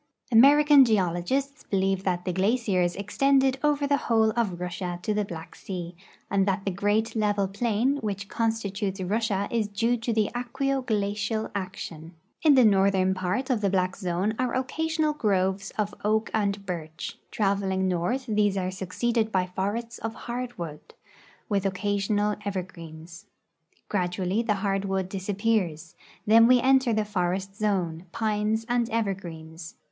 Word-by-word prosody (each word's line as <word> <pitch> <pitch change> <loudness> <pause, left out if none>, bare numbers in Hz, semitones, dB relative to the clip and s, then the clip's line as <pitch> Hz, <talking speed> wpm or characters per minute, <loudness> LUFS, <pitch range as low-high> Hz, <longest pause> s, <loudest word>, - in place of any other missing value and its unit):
American 285 +4 +7
geologists 220 - 0
believe 195 -1 0
that 180 -2 -1
the 180 - -1
glaciers 190 -3 +1
extended 265 +6 +2
over 295 -1 +2
the 285 0 +2
whole 220 -1 +4
of 210 -7 -1
Russia 180 0 -4
to 215 - 0
the 210 0 +1
Black 165 -4 -8
sea, 175 -2 -6 0.3
and 195 0 +1
that 195 0 0
the 195 - 0
great 205 +5 0
level 205 -2 +1
plain 235 +6 0
which 200 -5 -4
constitutes 210 -3 -2
Russia 200 +1 0
is 225 -3 0
due 225 +4 +1
to 230 0 -3
aqueo 250 +5 -1
glacial 210 -1 -1
action. 170 -4 -6 0.3
In 300 -3 +6
the 255 -3 +6
northern 195 -2 +3
part 190 +9 -2
of 235 -4 +1
the 200 - +2
black 185 0 0
zone 185 +2 -1
are 250 -1 0
occasional 310 +4 0
groves 195 -5 0
of 210 -1 -1
oak 215 +1 +1
and 200 -2 0
birch; 160 -3 -6
traveling 195 -2 0
north 185 +9 -1
these 210 -3 +1
are 185 -1 -1
succeeded 220 +4 -1
by 185 -2 +1
forests 230 +5 -3
of 225 0 -4
hardwood, 235 -11 -6 0.5
with 200 -3 0
occasional 205 +2 0
evergreens. 170 -4 -7 0.6
Gradually 185 +1 0
the 220 -3 0
hard 195 0 0
wood 190 -1 -1
disappears; 190 -4 -1 0.3
then 225 +2 +7
we 250 0 +6
enter 265 0 +4
the 215 -1 +1
forest 190 0 -2
zone, 185 -5 -1
j)ines 215 +1 0
and 240 -1 +1
evergreens. 175 -6 -4
205 Hz, 145 wpm, -26 LUFS, 185-230 Hz, 0.6 s, American